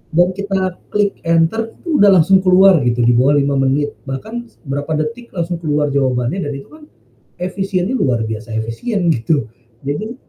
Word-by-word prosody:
dan 175 +1 +5
kita 195 0 -2 0.3
klik 205 -1 -1
enter 165 +8 +1
itu 330 -4 -2
udah 205 - +6
langsung 185 +3 +5
keluar 185 -1 +5
gitu 120 0 +1
di 120 - +4
bawah 135 +5 +3
5 140 0 +1
menit, 140 +2 +1 0.2
bahkan 220 - -6
s - - -28
berapa 145 +1 -4
detik 230 +10 -4
langsung 170 0 -2
keluar 150 -2 0
jawabannya 130 +4 0
dan - - -3
itu 135 - -9
kan 305 -1 -15 0.5
efisiennya 190 +4 -2
luar 125 - +1
biasa 110 +1 -6
efisien 175 - -2
gitu. 130 -1 0 0.4
Jadi, 215 - -3
165 Hz, 170 wpm, -17 LUFS, 135-200 Hz, 0.5 s, udah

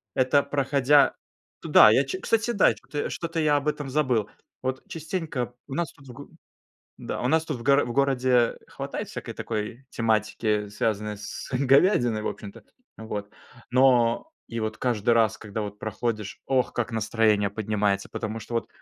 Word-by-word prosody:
это, 130 +2 +4
проходя 140 0 +3 0.5
туда, - - +7
я - - +4
чу 375 - -4
кстати, 225 +1 +1
да, 205 -5 +4
кто 145 - -4
что-то 165 0 -3
я 150 -2 +3
об 145 - -3
этом 145 -2 -2
забыл. 130 -7 +1 0.4
Вот 130 0 -2
частенько 155 -7 -4
у 135 - -6
нас 170 -4 -2
тут 135 -2 -18
в 125 - -10
г 140 +3 -10 0.7
Да, - - -5
у 125 - +1
нас 160 +2 +2
тут 150 -6 -4
в - - -9
гор 140 +2 +4
в 120 - -4
городе 130 -3 +2
хватает - - -6
всякой - - -7
такой 115 +4 -5
тематики, 110 -1 0
связанной 105 0 -2
с 105 0 -7
говядиной 130 - +3
в - - -2
общем-то, 100 -2 -8 0.3
вот. 105 -2 -6 0.4
Но 125 - +3 0.2
и 115 - -5
вот 110 0 -3
каждый 120 -2 0
раз, 115 -3 +2
когда 105 0 -5
вот 105 0 -6
проходишь, 110 -2 -4
ох, 130 -2 +1
как 120 0 -2
настроение 110 -2 +2
поднимается! 105 -1 -1
Потому 110 +1 -4
что, 120 - -8
вот 115 - -1
120 Hz, 170 wpm, -26 LUFS, 110-140 Hz, 0.7 s, туда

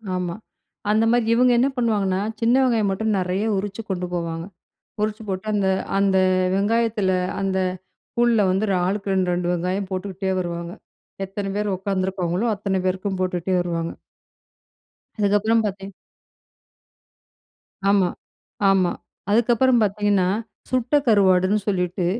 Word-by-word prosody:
ஆமா. 180 -2 -2 0.6
அந்த 215 +1 +3
மாரி 240 -1 +2
இவுங்க 250 +2 +4
என்ன 255 - +4
பண்ணுவாங்கன்னா, 205 -5 +1 0.2
சின்ன 230 +2 +4
வெங்காயம் 230 -5 +2
மட்டும் 215 +2 0
நெறைய 185 +3 -1
உரிச்சு 200 +2 -4
கொண்டு 180 -2 -2
போவாங்க. 165 -1 -3 0.6
உறிச்சு 215 +1 -2
போட்டு, 190 +1 -4
அந்த 200 -2 +1 0.3
அந்த 195 -1 +3 0.4
வெங்காயத்தில 210 -1 +1 0.3
அந்த 195 -1 0 0.6
கூழுல 235 -2 +3
வந்து 190 +4 +1
ஒரு 195 - +2
ஆளுக்கு 195 +1 -1
2 185 -1 +1
2 175 0 -1
வெங்காயம் 185 +3 -2
போட்டுக்கிட்டே 190 0 -3
வருவாங்க. 170 -1 -4 0.5
எத்தனை 195 +1 -5
பேர் 205 -1 0
உக்காந்துருக்காங்களோ, 190 +1 -1
அத்தனை 195 -1 -1
பேருக்கும் 190 +1 -1
போட்டுட்டே 185 0 -1
வருவாங்க. 170 -1 -2 1.3
அதுக்கப்பறம் 210 +2 +2
பார்த்தீன் 195 -1 -5 2.0
ஆமா, 195 -3 +3 0.6
ஆமா. 190 -2 +3 0.4
அதுக்கப்பறம் 240 +2 +3
பாத்தீங்கன்னா, 205 -2 +1 0.4
சுட்ட 255 +2 0
கருவாடுன்னு 195 -2 +4
சொல்லிட்டு, 180 -2 0
195 Hz, 120 wpm, -22 LUFS, 185-215 Hz, 2.0 s, இவுங்க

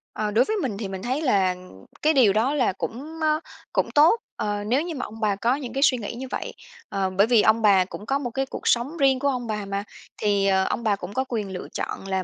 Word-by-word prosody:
Ờ, 215 -1 -1
đối 230 +5 +4
với 435 - -1
mình 260 - -2
thì 205 -1 -4
mình 190 -1 -6
thấy 260 +5 -1
là 195 -10 +2 0.5
cái 310 +1 +3
điều 240 -9 +5
đó 230 +7 +2
là 255 -9 +1
cũng, 285 +11 -6
ơ, 310 0 +2 0.3
cũng - - 0
tốt, 320 +10 +5 0.2
ờ, 205 -1 -2
nếu 245 +7 +1
như 335 0 -4
mà 260 - -3
ông 220 +1 -10
bà 210 -3 +1
có 235 +6 +1
những 275 -4 -6
cái 275 +1 +1
suy 255 - +5
nghĩ 225 0 -5
như 260 +2 -6
vậy. - - -4 0.4
Ờ, 195 -1 -1
bởi 195 +3 +3
vì 235 -3 +5
ông 220 +2 +3
bà 195 -4 +5
cũng 205 - -9
có 275 +4 0
một 255 -4 -3
cái 270 +3 -2
cuộc - - -6
sống 255 +8 +1
riêng 270 -3 +3
của 280 - 0
ông 250 -3 -1
bà 210 -2 -3
mà, 200 0 -3 0.4
thì, 200 -1 +2
ờ, 190 -1 +3
ông 235 - -2
bà 215 -3 +2
cũng 195 0 -8
có 260 - 0
quyền 210 -5 -3
lựa 180 - -6
chọn 195 - -4
là 190 -1 -1
230 Hz, 270 wpm, -24 LUFS, 200-270 Hz, 0.5 s, điều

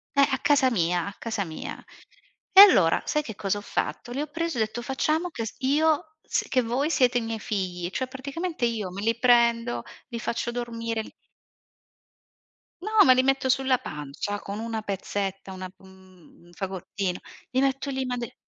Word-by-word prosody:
Beh, 280 0 +6
a 265 - +1
casa 280 -2 +4
mia 175 -5 0
a 200 - -6
casa 220 -3 -2
mia. 160 -4 -7 0.7
E 390 - +12
allora 190 - +7
sai 300 - 0
che 220 -6 -7
cosa 200 0 -1
ho - - -5
fatto: 240 - -3
li 265 +4 -2
ho 300 - -3
presi 330 0 -3
e - - +1
ho - - +5
detto: 220 +3 -6
"Facciamo 310 +7 0
che 230 -7 -4
s 220 - -7
io 310 +3 +2
s - - -1
che 255 - +3
voi 255 +7 -1
siete 250 -5 +3
i - - +1
miei 225 -1 -4
figli;" 185 -5 -3
cioè 260 +7 -2
praticamente 280 +3 -3
io 220 -5 -2
me 195 +2 -6
li 230 +2 +1
prendo, 235 - +3 0.3
li 235 -2 -5
faccio 235 +1 -2
dormire, 230 -2 -3
l - - -13 1.7
No, 425 - -4 0.2
me 255 - +8
li 255 0 +3
metto 270 0 +1
sulla 260 0 +3
pancia 150 - -5
con 200 +1 -6
una 225 -1 -3
pezzetta, 195 -1 -4
una 185 -1 -7
mhmm, 185 -3 -19
un - - -18
fagottino, 190 0 -4 0.3
li 260 0 +2
metto 270 +1 0
lì, 265 -1 -2
ma 250 -1 -2
de 235 -1 -6
235 Hz, 190 wpm, -26 LUFS, 195-265 Hz, 1.7 s, E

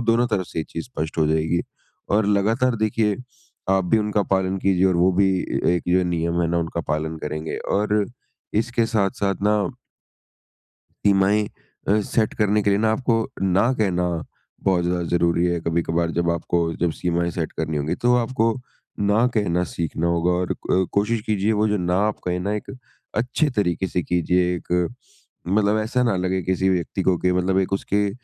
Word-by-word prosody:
दोनों 120 +1 +3
तरफ 95 -4 0
से - - -6
ये 80 - -1
चीज 80 - -5
स्पष्ट 80 -10 -5
हो 80 - +3
जाएगी। 80 +2 +1 0.5
और 105 +1 +3
लगातार 115 +5 +2
देखिए 110 -1 +1 0.5
आप 95 -1 +3
भी 110 +5 +3
उनका 105 -1 +1
पालन 95 0 0
कीजिए 95 -1 +2
और 90 -2 +2
वो 90 +2 +4
भी 95 +2 +3
ए - - -2 0.2
एक - - -3
जो 90 +1 +4
नियम 85 0 0
है 85 - +2
ना 85 0 +1
उनका 85 0 -2
पालन 80 +2 -1
करेंगे 75 +1 -4 0.2
और 105 +1 +2 0.5
इसके 115 +1 +1
साथ-साथ 100 -2 0
ना 105 +1 +3 1.5
सीमाएँ 100 +1 +3 0.4
अ, 105 +2 +4
सेट 110 +1 0
करने 105 0 +2
के 100 - +2
लिए 100 - +3
ना 110 +1 +2
आपको 115 0 +1 0.3
ना 95 +6 +3
कहना 90 -5 +1 0.6
बहुत 90 -2 +3
ज़्यादा 90 0 0
ज़रूरी 85 0 +2
है। 85 -1 0
कभी-कभार 85 0 0
जब 85 0 +2
आपको 85 +1 -1 0.2
जब 85 - +2
सीमाएँ 85 0 0
सेट 80 -1 -3
करनी 80 -1 -3
होंगी 75 +1 -1
तो 125 0 +5
आपको 115 -2 +1 0.5
ना 110 +4 +4
कहना 90 -4 +1
सीखना 85 -1 -3
होगा, 85 +1 +2
और 90 0 -1
अ, 95 +1 0
कोशिश 105 +2 +1
कीजिए 105 0 +1
वो 105 0 +2
जो 105 - +1
ना 90 0 0
आप 105 - -4
कहें 90 0 0
ना 100 +3 -1
एक 105 - -5 0.4
अच्छे 125 +7 +1
तरीके 95 -6 0
से 90 - -1
कीजिए। 90 +1 +1
एक 85 - -7 0.8
मतलब 105 +2 +2
ऐसा 115 +4 0
ना 115 -5 +1
लगे 95 +1 -1
किसी 95 +1 0
व्यक्ति 90 +1 0
को 95 -1 +3
कि 90 0 +1
मतलब 90 +1 +1
एक 95 0 0
उसके 100 +1 0
95 Hz, 185 wpm, -23 LUFS, 85-105 Hz, 1.5 s, तो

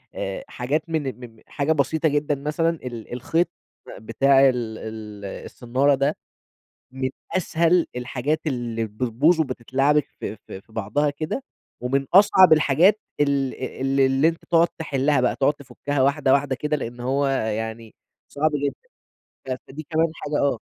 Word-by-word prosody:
آآ، 95 - -4
حاجات 150 +7 -2
من 135 -7 -2
مم 115 -1 -17
حاجة 145 +2 -1
بسيطة 155 +2 +1
جدًا 145 0 0
مثلًا، 150 +4 0
ال 120 -8 -6
الخيط 160 +8 0 0.5
بتاع 135 +5 +4
ال 115 -3 -3
ال 105 -2 -8
الصنّارة 130 +7 0
ده، 140 +3 0 0.8
من 130 -1 -2 0.3
أسهل 170 -1 +2
الحاجات 125 +5 -2
اللي 120 -5 -2
بتبوظ 125 +10 +1
وبتتلعبك 135 +2 +1
في 110 - -4
في 95 -1 -11
في 110 - -25
بعضها 130 +8 0
كده 155 - -4 0.4
ومن 135 +3 0
أصعب 190 -2 +7
الحاجات 155 +7 +4 0.2
ال 140 -2 +1
ال 135 +1 -1
اللي 135 +3 +4
أنت 165 0 -4
تُقعُد 170 0 +3
تحلّها 145 -3 +1
بقى، 125 - +1
تُقعُد 140 +1 +3
تُفُكّها 145 0 -3
واحدة 140 0 +2
واحدة 140 -1 +2
كده، 150 +2 -1
لإن 120 -3 -6
هو 135 +3 0
يعني 110 -3 -2 0.3
صعب 155 +2 0
جدًا. 140 - 0 0.7
ف - - -9 0.2
فدي 150 +4 -8
كمان 160 0 +1
حاجة 145 0 -3
آه. 140 -5 +1
135 Hz, 150 wpm, -23 LUFS, 125-150 Hz, 0.8 s, أصعب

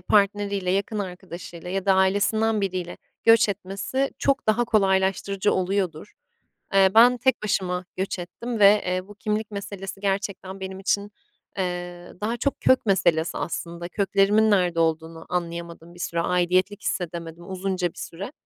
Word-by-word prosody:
partneriyle, 200 -1 +1
yakın 200 +3 -1
arkadaşıyla 180 -2 -7
ya 195 +1 -2
da 195 - +6
ailesinden 205 +3 +2
biriyle 185 -3 -3 0.3
göç 225 0 +6
etmesi 200 +7 -2
çok 275 -4 +1
daha 225 +3 +3
kolaylaştırıcı 195 -2 +1
oluyordur. 185 -1 -1 0.6
Eee, 195 -1 +6
ben 240 +3 +7
tek 260 +2 +1
başıma 185 -3 -1
göç 190 0 -2
ettim 225 +7 -5
ve, 205 0 +6
eee, 185 +1 -2
bu 205 - -11
kimlik 210 +1 -2
meselesi 200 -1 -6
gerçekten 195 -1 -3
benim 190 0 -6
için, 200 +1 0 0.5
eee, 175 -1 -4
daha 225 +3 -1
çok 280 +4 -2
kök 260 -3 +3
meselesi 175 -4 +2
aslında. 170 0 -4
Köklerimin 200 +3 +3
nerede 180 -4 +2
olduğunu 160 0 -1
anlayamadım 170 -1 -5
bir 175 - -14
süre, 170 -1 -1
aidiyetlik 180 +3 +1
hissedemedim 170 0 -4
uzunca 185 -1 -1
bir - - -17
süre. 195 +9 -7
190 Hz, 145 wpm, -24 LUFS, 180-205 Hz, 0.6 s, ben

